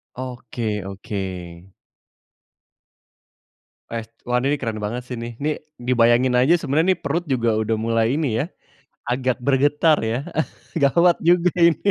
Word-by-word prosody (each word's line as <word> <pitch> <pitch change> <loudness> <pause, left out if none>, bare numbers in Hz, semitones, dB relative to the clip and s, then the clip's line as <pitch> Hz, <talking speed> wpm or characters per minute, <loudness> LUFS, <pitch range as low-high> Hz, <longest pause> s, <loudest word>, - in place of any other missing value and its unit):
Oke 120 -4 -4
oke. 100 +2 -7 2.7
Es 115 -1 -4 0.2
wah 125 0 0
ini 140 +4 +1
nih - - -4
keren 110 -2 -2
banget 105 +4 -3
sih, 125 - -3
nih 115 0 -6
nih, 150 0 0 0.2
dibayangin 125 +1 +3
aja 135 +8 +5
sebenernya 160 +3 +2
nih - - -19
perut 165 +5 -1
juga 120 -5 +1
udah 110 +1 0
mulai 115 +2 +1
ini 140 -8 0
ya, 140 - 0 0.6
agak 125 0 0
bergetar 145 +3 +3
ya, 115 +5 -2 0.5
gawat 170 +4 +4
juga 175 +1 +3
ini. 170 +4 +4
125 Hz, 135 wpm, -22 LUFS, 115-150 Hz, 2.7 s, aja